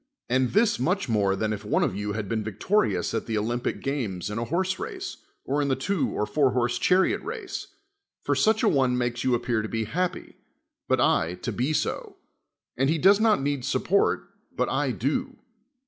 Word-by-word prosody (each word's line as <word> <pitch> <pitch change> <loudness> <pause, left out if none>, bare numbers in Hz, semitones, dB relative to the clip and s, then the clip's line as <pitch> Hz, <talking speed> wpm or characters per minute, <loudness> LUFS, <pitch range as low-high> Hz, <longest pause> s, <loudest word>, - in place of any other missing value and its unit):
and 130 0 +1
this 210 - +3
much 180 +9 0
more 100 -4 +2
than 110 +1 -1
if 105 0 -6
one 105 - +1
of - - 0
you 105 +1 -3
had 105 -2 -3
been 110 +1 -1
victorious 110 - 0
at 115 - -2
the 110 -2 -1
Olympic 120 +3 -2
games 110 -10 -2
in 105 - -3
a 120 - -2
horse 185 +7 0
rai^e, 390 -1 -6 0.3
or 145 +2 0
in 145 - 0
the 135 - +2
two 160 +7 -1
or 105 - -1
four 135 +1 +2
horsed 120 -1 0
chariot 185 +1 +3
race: 435 -1 -6 0.6
for - - +1
such 220 0 +2
a - - +4
one 130 -3 +3
makes 120 -1 -1
you 130 -2 +3
appear 120 -1 0
to 110 - -5
be 115 -1 -1
happy, 175 - -3 0.5
but - - +2
L 85 +2 +2
to 90 - -4
be 130 +6 -1
so: 155 - -2 0.6
and 135 +2 +1
he 160 - +2
does 195 +6 +5
not 215 -9 +3
need 140 -2 -1
support, 200 +9 +1 0.3
but - - +1
I - - 0
do. - - -2
130 Hz, 200 wpm, -26 LUFS, 110-180 Hz, 0.6 s, does